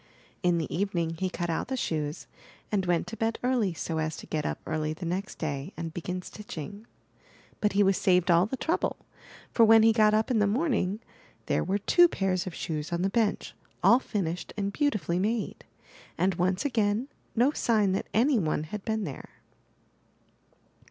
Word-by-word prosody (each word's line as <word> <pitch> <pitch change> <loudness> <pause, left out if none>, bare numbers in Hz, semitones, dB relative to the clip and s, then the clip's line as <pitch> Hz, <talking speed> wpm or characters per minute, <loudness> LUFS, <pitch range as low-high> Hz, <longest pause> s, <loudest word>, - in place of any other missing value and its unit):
In 175 -2 +2
the 160 - -3
evening 170 -3 -1
he 185 - 0
cut 175 -2 -3
out 160 - -2
the 265 +1 -2
shoes, 155 -8 -2 0.5
and 195 -3 0
went 175 -2 +2
to 225 - -7
bed 225 +1 -1
early 245 -6 +2
so 160 0 -3
as 155 0 -2
to - - -9
get 155 -2 -2
up - - -3
early 155 -1 -1
the 170 +3 -7
next 185 +4 -3
day 145 -3 -4
and 165 -1 -5
begin 180 +2 -4
stitching. 205 +2 -8 0.7
But 210 -2 +1
he 205 +1 +4
was 195 -1 +3
saved 180 -2 +3
all 170 +3 +5
the 265 - -4
trouble, 325 +5 0 0.5
for 230 - +4
when 225 0 +7
he 225 0 +6
got 215 -1 +4
up 220 +3 +1
in 230 - +3
the 210 - +3
morning, 220 - 0 0.4
there - - +1
were 195 +2 0
two 350 - +5
pairs 190 - -1
of 180 - -5
shoes 155 -1 -4
on 170 +1 -1
the 195 - +1
bench, 225 -2 0 0.3
all 235 - +7
finished 180 -8 -3
and 200 -1 -2
beauti 290 -7 +1
fully 170 +2 -1
made, 215 +3 -2 0.5
and 190 +1 +2
once 180 +6 0
again 225 -2 +1 0.3
no 245 +5 +4
sign 215 -8 +2
that 190 - -2
any 245 +3 +3
one^ 155 -3 -1
had 200 +5 -6
been 220 -1 -1
there. 140 -8 -7
195 Hz, 190 wpm, -28 LUFS, 170-220 Hz, 0.7 s, when